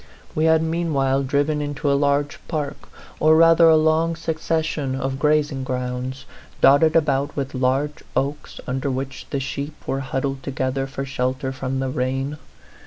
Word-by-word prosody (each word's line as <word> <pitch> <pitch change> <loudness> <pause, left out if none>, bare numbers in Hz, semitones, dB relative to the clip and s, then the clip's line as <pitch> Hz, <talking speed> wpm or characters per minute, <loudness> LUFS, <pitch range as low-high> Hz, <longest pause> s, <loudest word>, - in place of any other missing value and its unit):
We 155 - +1
had 160 0 +4
meanwhile 155 -5 +1
driven 145 +3 0
into 145 0 -1
a - - +4
large 140 +1 +1
park, 150 -3 -4 0.3
or 155 +1 +5
rather 165 0 +6
a 160 - +7
long 160 +1 +2
succession 155 -4 -2
of 135 0 -3
grazing 150 -2 +1
grounds, 125 0 -4 0.3
dotted 155 +3 +5
about 145 -3 +1
with 140 -1 -3
large 135 +3 0
oaks, 145 +2 -2
under 135 +2 -2
which 135 0 -4
the 140 - -1
sheep 140 +3 -4
were 135 - -1
huddled 135 0 -3
together 135 0 -2
for 135 0 -5
shelter 130 0 -2
from 130 0 -3
the 135 0 -1
rain. 135 +3 -2
140 Hz, 155 wpm, -22 LUFS, 135-155 Hz, 0.3 s, a